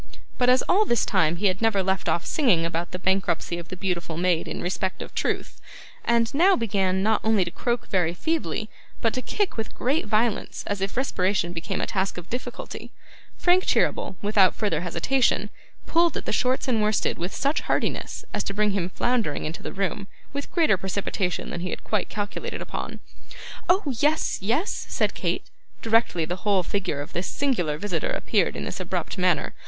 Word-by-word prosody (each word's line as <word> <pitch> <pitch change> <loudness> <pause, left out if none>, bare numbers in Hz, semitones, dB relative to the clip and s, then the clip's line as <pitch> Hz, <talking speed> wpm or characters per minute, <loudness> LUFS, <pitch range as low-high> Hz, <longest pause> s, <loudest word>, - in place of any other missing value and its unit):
But, 250 0 +4
as 255 0 +5
all 400 +4 +4
this 235 - +2
time 160 +1 +2
he 195 +4 -2
had 190 0 +2
never 220 -4 +3
left 190 0 0
off 170 - 0
singing 210 - +3
about 170 +1 -2
the - - -4
bankruptcy 190 -2 0
of 170 - -9
the 185 - -6
beautiful 175 -3 -2
maid 175 -1 +1
in - - -4
respect 185 +1 -2
of - - -12
truth, - - -2 0.4
and 235 -1 +2
now 365 +7 +5
began 190 -4 +1
not 220 +1 +3
only 220 -4 +3
to 170 - -5
croak 240 +3 -2
very 175 -3 +1
feebly, 315 - -1 0.3
but 225 - +1
to 255 - -1
kick 405 - -1
with 225 - -4
great 270 0 0
violence 215 +1 0
as 205 -1 -2
if 195 +4 -2
respiration 185 -8 +1
became 180 +3 -3
a - - +1
task 190 -1 -1
of 175 0 -8
difficulty, 245 +2 -6 0.5
Frank 365 +1 +4
Cheeryble, - - +1
without 200 -3 +4
further 185 -8 0
hesitation, 240 +9 +1 0.3
pulled 335 -1 +3
at - - -5
the - - -1
shorts 255 +4 +1
and 230 -4 +2
worsteds 210 0 +1
with 180 +4 -3
such 280 +3 +1
heartiness - - -1
as - - 0
to 200 - -3
bring 210 0 +3
him 190 -3 -1
floundering 230 -6 0
into 155 +2 -5
the - - -5
room 195 +1 -2 0.3
with 280 0 -4
greater 320 - +4
precipitation 190 -1 -2
than - - -4
he 185 - -3
had - - -5
quite 215 -3 -1
calculated 215 - -4
upon. - - -5 0.7
'Oh! 375 +3 +4 0.2
yes, 300 +2 +2
yes,' 245 - 0
said - - +1
Kate, - - -2 0.4
directly 225 -7 +3
the 180 +3 -3
whole 195 -1 +2
figure 180 -5 -2
of 145 - -8
this 175 +2 -2
singular 180 - 0
visitor 175 -2 -1
appeared - - +1
in - - -4
this - - -4
abrupt - - -3
manner. - - +2
200 Hz, 190 wpm, -25 LUFS, 180-240 Hz, 0.7 s, as